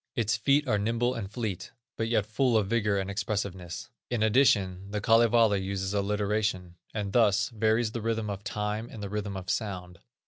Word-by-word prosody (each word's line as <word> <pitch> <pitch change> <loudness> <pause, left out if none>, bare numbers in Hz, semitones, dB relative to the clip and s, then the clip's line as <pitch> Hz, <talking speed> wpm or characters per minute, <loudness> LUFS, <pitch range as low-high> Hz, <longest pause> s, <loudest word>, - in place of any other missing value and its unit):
Its 110 -2 +1
feet 140 +7 +2
are 105 -4 +2
nimble 115 +4 0
and 110 -6 -5
fleet, 105 -4 -4 0.3
but 115 - -1
yet 115 -3 +1
full 115 +2 +2
of 105 - +2
vigor 105 -1 +1
and 95 -1 -1
expressiveness. 100 -1 -4 0.2
In 120 -3 0
addition, 100 -6 +3
the 105 +1 -2
Kalevala 115 -1 +4
uses 95 0 -3
alliteration, 100 -2 -1 0.2
and 100 -2 -4
thus 105 -3 +3
varies 110 0 +1
the 115 - -4
rhythm 115 -1 -1
of 100 -1 -5
time 105 +2 -3
with 115 - -10
the 100 - -4
rhythm 100 -1 -3
of 95 -1 -7
sound. 90 -5 -4
105 Hz, 180 wpm, -28 LUFS, 100-115 Hz, 0.3 s, Kalevala